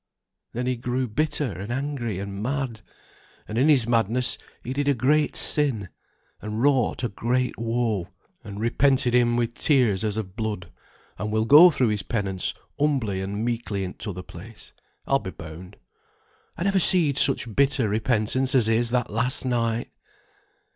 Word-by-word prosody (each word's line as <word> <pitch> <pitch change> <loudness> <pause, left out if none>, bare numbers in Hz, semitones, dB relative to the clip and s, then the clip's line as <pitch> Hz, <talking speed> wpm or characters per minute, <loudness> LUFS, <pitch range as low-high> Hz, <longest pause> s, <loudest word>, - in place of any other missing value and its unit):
Then 125 +2 -3
he 125 -1 -1
grew 125 +2 -2
bitter, 145 +2 -1
and 100 +5 -7
angry, 130 -6 -3
and 100 +1 -6
mad; 130 -2 -3 0.7
and 105 - -6
in 140 +4 +4
his 135 -6 +4
madness 120 +1 +1 0.2
he 125 - -4
did 145 +1 -2
a 140 - +3
great 150 +5 +1
sin, 125 - +2 0.5
and 105 +1 -5
wrought 130 -2 +1
a - - +2
great 125 +4 -1
woe; 115 -5 -1 0.4
and 100 -2 -8
repented 125 +2 +2
him 120 -1 +3
with 120 -1 -1
tears 125 -9 +2
as 105 -1 -1
of 95 -4 -5
blood; 105 -6 -4 0.5
and 105 +2 -3
will 110 0 +1
go 150 +9 +9
through 130 -7 +1
his 105 -1 -1
penance 95 -5 -3 0.2
humbly 130 -10 0
and 100 +3 -3
meekly 115 -4 -2
in 90 - -5
t'other 90 -4 -6
place, 105 +6 -12 0.3
I'll 135 - +2
be 95 - -7
bound. 85 +3 -10 0.8
I 170 - -3
never 195 0 +2
seed 165 -5 +4
such 120 -5 +2
bitter 135 -4 +3
repentance 115 +4 0
as 125 -4 +4
his 115 +1 +2
that 125 0 -1
last 120 +4 -1
night." 115 -2 -1
120 Hz, 160 wpm, -24 LUFS, 105-130 Hz, 0.8 s, go